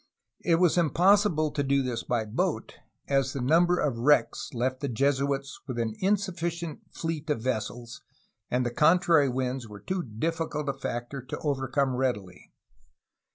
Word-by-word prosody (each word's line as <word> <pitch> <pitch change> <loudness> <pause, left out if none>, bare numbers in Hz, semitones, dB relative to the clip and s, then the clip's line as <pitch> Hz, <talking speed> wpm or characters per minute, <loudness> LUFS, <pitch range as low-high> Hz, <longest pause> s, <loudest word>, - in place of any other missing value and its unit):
It 170 - +4
was 175 0 +3
impossible 175 -1 +3
to 145 - -1
do 140 0 +2
this 120 -3 -2
by 120 -3 -1
boat, 105 - -2 0.3
as 135 -1 +1
the 140 - -3
number 170 +7 +3
of 140 -8 0
wi^ecks 145 +6 +2
left 130 0 -1
the 140 - -2
Jesuits 140 +2 0
with 130 -3 -4
an 115 -2 -1
insufficient 175 -5 -1
fleet 160 -1 -4
of 140 -7 -1
vessels 120 -1 -3 0.5
and 125 0 +1
the 120 - -1
con 155 +8 +5
trary 165 -7 +3
winds 130 -1 -2
were 105 -1 -10
too 185 - -2
difficult 150 +4 -3
a - - 0
factor 135 0 -5
to 125 - -6
overcome 135 -2 0
readily. 105 -8 -3
140 Hz, 155 wpm, -28 LUFS, 125-165 Hz, 0.5 s, con